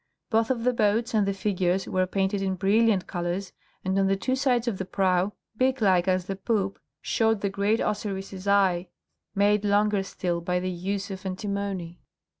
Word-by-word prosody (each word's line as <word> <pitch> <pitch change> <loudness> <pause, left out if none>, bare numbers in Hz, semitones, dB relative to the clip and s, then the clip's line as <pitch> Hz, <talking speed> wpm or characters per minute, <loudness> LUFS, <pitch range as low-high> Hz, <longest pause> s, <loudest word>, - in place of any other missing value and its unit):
Both 225 0 +3
the 250 0 +1
boats 225 +2 +1
and 210 -3 +2
the 200 - +1
figures 190 -2 0
were 185 0 +1
painted 195 +1 0
in 190 -1 0
brilliant 200 0 +3
colours, 175 +2 -3 0.3
and 190 +1 +1
on 195 - +3
the 195 - +2
two 255 +7 -1
sides 255 -3 +1
of 210 -5 -1
the - - -1
prow, 185 +1 +1 0.2
beak 260 +3 +1
like 190 -4 +3
as 185 -1 +1
the 195 - -3
poop, 195 -1 -1 0.2
showed 225 -2 +1
the 200 - 0
great 200 +3 +1
Osiris' 195 -2 -3
eye, 190 -3 +3 0.5
made 205 +1 +3
longer 205 0 +2
still 175 -2 -3
by 180 +1 0
the 185 +1 -2
use 195 +3 -3
of 190 -1 -7
antimony. 190 -2 -4
195 Hz, 180 wpm, -26 LUFS, 185-210 Hz, 0.5 s, Both